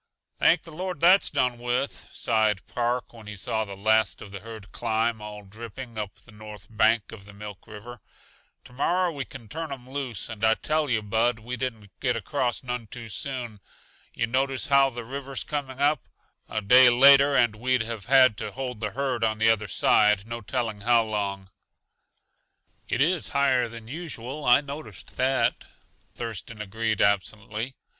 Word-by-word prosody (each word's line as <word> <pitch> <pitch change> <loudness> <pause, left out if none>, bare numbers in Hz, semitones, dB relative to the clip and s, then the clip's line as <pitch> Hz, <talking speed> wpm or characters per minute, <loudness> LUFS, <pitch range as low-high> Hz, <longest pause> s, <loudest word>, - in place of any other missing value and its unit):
"Thank 165 0 +4
the 165 - -11
Lord 180 0 -5
that's 180 +5 +5
done 125 -2 0
with," 125 +3 -2
sighed 110 -4 +1
Park 120 +1 -2
when 110 -2 -13
he 105 - -7
saw 110 +3 -1
the 100 -1 -9
last 110 +1 +2
of 100 - -10
the 100 - -7
herd 110 -1 -11
climb, 115 -1 -1
all 105 -1 -8
dripping, 115 +4 -9
up 105 -2 -5
the 120 - -19
north 105 -2 -11
bank 110 0 +2
of 100 -3 -11
the 100 - -13
Milk 105 -1 -10
River. 110 +3 -10 0.6
"To - - -14
morrow 175 +7 +1
we 140 -4 -5
can 125 -4 -11
turn 160 +6 -5
'em 130 -2 -8
loose. 130 -6 -3
And 110 -1 -8
I 110 0 +5
tell 155 +2 0
yuh, 115 -3 +1
Bud, 115 +3 +1
we 120 +3 -6
didn't 115 -5 -5
get 125 -3 +1
across 120 +3 -2
none 125 -2 -4
too 115 +1 -9
soon. 120 -2 -4 0.6
Yuh 115 - +1
notice 130 +3 0
how 140 -1 +5
the 120 -2 -7
river's 135 +1 -5
coming 140 -3 -4
up? 145 0 +2 0.4
A 110 - -2
day 125 +5 +7
later 140 +3 +7
and 120 -4 +3
we'd 125 +2 +1
have 115 -3 -6
had 130 -3 +5
to - - -5
hold 125 -4 -5
the 105 -1 -3
herd 130 -4 -1
on 110 -1 +1
the 110 +1 +5
other 110 -1 0
side, 105 +2 +3
no 115 0 -5
telling 110 -1 -3
how 115 +1 +4
long." 100 -3 -3 1.4
"It 125 - 0
is 170 +3 +2
higher 130 -3 +3
than 115 -1 -9
usual; 145 -2 -5
I 125 +3 +6
noticed 140 -9 -8
that," 130 +1 +1 0.5
Thurston 115 -1 -6
agreed 110 +1 -1
absently. 110 +4 -1
115 Hz, 180 wpm, -26 LUFS, 110-130 Hz, 1.4 s, day